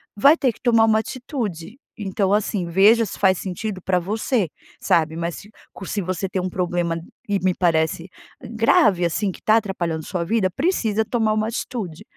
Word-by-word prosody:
vai 280 +9 +6
ter 265 -6 +1
que - - -20
tomar 230 -3 +4
uma 220 -1 +3
atitude. 230 - -5 0.2
Então, 195 -2 -1
assim, 205 -3 0
veja 205 +7 +5
se 200 - -8
faz 190 -3 +4
sentido 190 +1 -4
pra 185 0 0
você, 210 - -1 0.3
sabe, 160 -1 +2
mas 170 0 -3
se 210 - -12 0.2
co 195 - -10
se 205 - -2
você 185 +1 -3
tem 185 0 -2
um 185 - -2
problema 175 -2 -1 0.3
e 200 - +2
me 185 -1 +1
parece 165 0 0 0.3
grave, 220 -5 +3
assim, 190 +4 0
que - - -12
tá 220 +1 +5
atrapalhando 175 -7 -2
sua 175 -1 -3
vida, 205 0 +1
precisa 220 - 0
tomar 220 -1 0
uma 215 0 0
atitude, 220 - -5
195 Hz, 180 wpm, -22 LUFS, 175-220 Hz, 0.3 s, vai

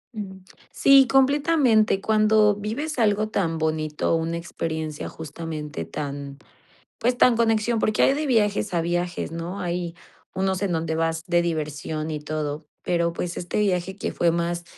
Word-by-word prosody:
Mm. 190 -3 -7 0.3
Sí, 275 -1 +6
completamente. 270 -5 +3
Cuando 215 0 +3
vives 245 +8 -4
algo 215 -1 +2
tan 165 -6 -1
bonito, 155 0 0
una 165 +1 -1
experiencia 160 -2 -4
justamente 155 - -6
tan, 140 - -6 0.6
pues, 245 +1 0
tan 245 -2 +5
conexión, 225 0 +2
porque 215 -1 +1
hay 270 - +5
de 300 +2 -2
viajes 210 -5 +1
a 170 - +1
viajes, 175 0 -2
¿no? 170 +4 -5
Hay 175 -1 -3 0.4
unos 190 0 -1
en 200 - 0
donde 160 -1 -1
vas 165 0 -1
de 175 -1 +2
diversión 155 -1 -3
y 155 -1 -3
todo. 150 0 -4 0.2
Pero, 170 -1 0
pues, 175 0 -4
este 175 - -3
viaje 190 -2 0
que - - -3
fue 170 - +2
más 170 +1 -2
175 Hz, 155 wpm, -24 LUFS, 160-215 Hz, 0.6 s, Sí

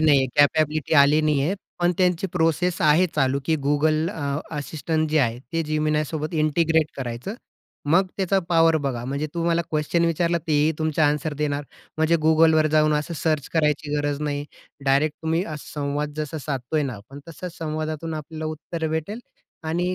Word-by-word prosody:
नाहीये, 145 -4 +4
कॅपॅबिलिटी 155 +1 +3
आली 145 +2 +6
नाहीये, 150 +4 +1 0.2
पण 175 0 +2
त्यांची 180 0 +2
प्रोसेस 170 +1 +1
आहे 155 +4 +5
चालू, 135 -2 +2
की 160 +1 +1
Google 155 +2 +2
अ, 160 - -7 0.4
Assistant 155 +2 -2
जे 155 - +2
आहे, 120 -4 +1
ते 165 0 0
Geminiसोबत 155 +1 -1
इंटिग्रेट 160 0 +2
करायचं. 125 - -5 0.6
मग 185 +2 +5
त्याचा 195 0 +1
पॉवर 165 -1 +4
बघा. 120 -3 -2
म्हणजे 140 +4 -2
तुम्हाला 170 0 +1
क्वेशन 155 +2 +1
विचारला, 170 +1 +1
तेही 150 0 +3
तुमचे 155 0 0
एन्सर 150 0 +1
देणार. 145 -1 -1 0.3
म्हणजे 160 +1 +3
Googleवर 160 -1 +5
जाऊन 155 0 +4
असं 150 +3 -2
सर्च 155 -2 -1
करायची 150 -2 +1
गरज 145 0 -1
नाही. 145 -1 -2 0.4
डायरेक्ट 140 +3 +2
तुम्ही 165 +3 0
असा 155 -4 -8
संवाद 145 0 -2
जसा 155 0 -4
साधतोय 140 +2 -1
ना 130 -3 -3
आपण, 110 +8 -12
तसच 175 +2 -8
संवादातून 155 0 -3
आपल्याला 155 +1 -6
उत्तरं 160 +1 -4
भेटेल 180 +9 -3 0.4
आणि 175 +3 -1
155 Hz, 160 wpm, -23 LUFS, 145-165 Hz, 0.6 s, आली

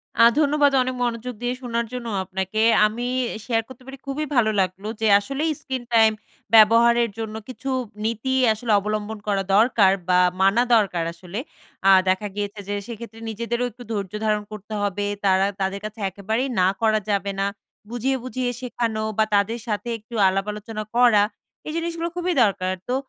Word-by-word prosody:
আ - - +5 0.2
ধন্যবাদ 295 -1 +3
অনেক 255 0 -2
মনোযোগ 240 +1 -2
দিয়ে 245 0 -1
শোনার 235 -2 -2
জন্য 245 -2 -5 0.2
আপনাকে। 190 +3 -2 0.2
আমি 230 +3 -2 0.4
শেয়ার 225 -2 +1
করতে 260 -1 -13
পেরে 270 +1 -9
খুবই 285 +3 -2
ভালো 225 -3 +4
লাগলো। 190 +2 -3
যে 220 - +2
আসলেই 275 +9 -2
স্ক্রিন 260 -3 -4
টাইম 220 -1 +6 0.4
ব্যবহারের 230 +2 +6
জন্য 220 -1 -4
কিছু 270 +1 -6 0.4
নীতি 230 +4 -1 0.2
আসলে 220 +1 -3
অবলম্বন 210 +1 -3
করা 200 -2 +1
দরকার, 215 -3 +5 0.2
বা 180 0 +5 0.2
মানা 195 +5 +4
দরকার 195 -6 +1
আসলে। 180 +4 -7 0.5
আ - - +8 0.2
দেখা 190 +3 +1
গিয়েছে 205 0 -4
যে - - -1
সেক্ষেত্রে 230 -1 -9
নিজেদেরও 235 +2 -2
একটু 245 +3 -12
ধৈর্য 200 -4 -3
ধারণ 210 -1 +1
করতে 215 0 -8
হবে। 205 0 -1 0.2
তারা 190 0 +4 0.2
তাদের 190 +1 -1
কাছে 215 +1 -7
একেবারেই 220 +7 -2
না 180 - +4
করা 215 -1 +3
যাবে 200 0 0
না। 195 - +1 0.4
বুঝিয়ে, 245 +3 -1
বুঝিয়ে 255 -1 -2
শেখানো 230 -3 -2
বা 220 - +4
তাদের 210 +4 +1
সাথে 220 +2 -2
একটু 220 +2 -17
আলাপ 195 +1 0
আলোচনা 215 +1 -6
করা। 240 -4 +5 0.4
এই 305 - -4
জিনিসগুলো 335 0 -2
খুবই 355 0 -1
দরকার। 185 -3 0 0.2
তো 250 - +1
220 Hz, 170 wpm, -23 LUFS, 205-245 Hz, 0.5 s, আ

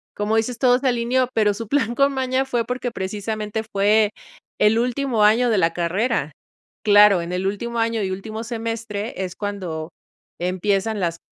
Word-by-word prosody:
como 210 +1 0
dices 230 +2 -1
todo 250 0 +4
se 270 - -1
alineó, 245 +1 +1
pero 210 -2 +3
su 225 +2 -7
plan 240 -1 0
con 280 +1 +3
maña 260 0 0
fue 245 -3 -1
porque 250 0 -3
precisamente, 210 +2 -4
fue 205 +1 +3 0.5
el 215 +2 +4
último 245 -2 0
año 230 +4 +4
de 220 - +2
la 165 -3 +2
carrera. 180 - -1 0.5
Claro, 205 -3 +6
en 170 +1 -6
el 185 +1 -1
último 235 +4 -3
año 225 -1 0
y 190 - -2
último 215 +4 -5
semestre 225 -2 -4
es 185 -1 -5
cuando 180 -6 -5 0.5
empiezan 195 +4 0
las 170 -2 -1
220 Hz, 170 wpm, -22 LUFS, 200-235 Hz, 0.5 s, Claro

